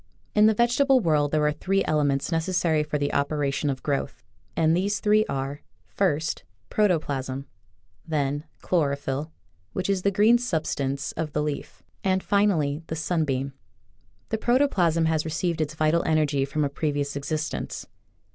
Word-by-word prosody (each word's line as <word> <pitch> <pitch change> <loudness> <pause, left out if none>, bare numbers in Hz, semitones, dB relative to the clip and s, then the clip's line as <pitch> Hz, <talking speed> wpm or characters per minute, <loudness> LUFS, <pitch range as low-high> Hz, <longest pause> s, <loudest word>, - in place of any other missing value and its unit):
In 210 0 +6
the 220 - +3
vegetable 255 +4 +4
world 150 -7 +2
there 150 0 +1
are 150 - +3
three 195 +6 0
ele 150 -1 +2
ments 140 +2 0
necessary 165 -1 +1
for 150 0 -2
the 145 0 -1
operation 140 0 0
of 130 -1 -3
growth, 140 -2 -2 0.3
and 160 0 +4
these 200 +3 0
three 215 +1 +3
are: 135 +1 -3 0.2
First, 160 -5 -1 0.3
protoplasm; 140 -9 0 0.6
then, 145 -1 -1 0.2
chlorophyl, 140 -3 0 0.4
which 185 +1 -1
is 190 -2 0
the 200 - +2
green 215 +5 +4
substance 145 - -2
of 155 -2 -4
the 150 - 0
leaf; 150 -1 -5 0.2
and, 190 -1 +1
finally, 170 -8 +2
the 160 - -3
sunbeam. 150 -5 -1 0.8
The 220 - -1
pro 240 +3 +3
toplasm 175 - +2
has 160 -1 +1
received 165 +1 -1
its 155 0 -2
vital 155 +2 +2
energy 150 -3 +2
from 150 +2 -1
a - - -1
previous 145 -1 -2
existence. 150 +2 -3
155 Hz, 155 wpm, -25 LUFS, 145-185 Hz, 0.8 s, In